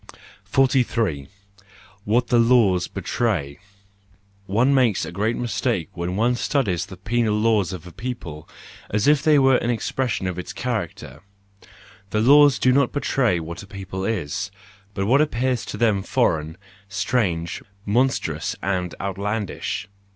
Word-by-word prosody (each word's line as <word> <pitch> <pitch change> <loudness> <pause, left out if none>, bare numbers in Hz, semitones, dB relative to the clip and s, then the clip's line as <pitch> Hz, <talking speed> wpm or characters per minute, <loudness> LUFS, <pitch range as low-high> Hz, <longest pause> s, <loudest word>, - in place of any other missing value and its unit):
43 115 - +1 0.8
What 120 +4 +1
the 120 -2 +4
Laws 115 -7 +4
Betray 95 - -2 0.9
.—One 120 +8 +3
makes 125 -7 +2
a - - -7
great 105 +6 -1
mis¬ 120 -2 -3
take 100 -6 -1
when 90 +1 -3
one 115 +4 +2
studies 100 - 0
the 95 - -10
penal 105 +2 0
laws 105 -4 +2
of 90 -3 -7
a 90 - -10
people, 85 -10 -7 0.4
as 105 +3 0
if 150 -2 +5
they 155 0 +4
were 135 -2 +5
an 120 - -2
expression 120 -1 -1
of 90 -1 -3
its 90 - -6
character; 115 -9 -4 0.9
the 105 - 0
laws 140 +4 +6
do 130 - +3
not 140 -1 +3
betray 125 -9 +1
what 85 +2 -7
a 100 - -12
people 95 -1 -6
is, 95 -1 -2 0.5
but 95 - -1
what 135 +7 +4
appears 130 -4 0
to - - -6
them 110 -4 +2
foreign, 80 -3 0 0.3
strange, 100 -5 -1 0.2
monstrous, 125 +6 0
and 90 -2 -1
outlandish. 100 +2 -3
105 Hz, 145 wpm, -23 LUFS, 95-125 Hz, 0.9 s, laws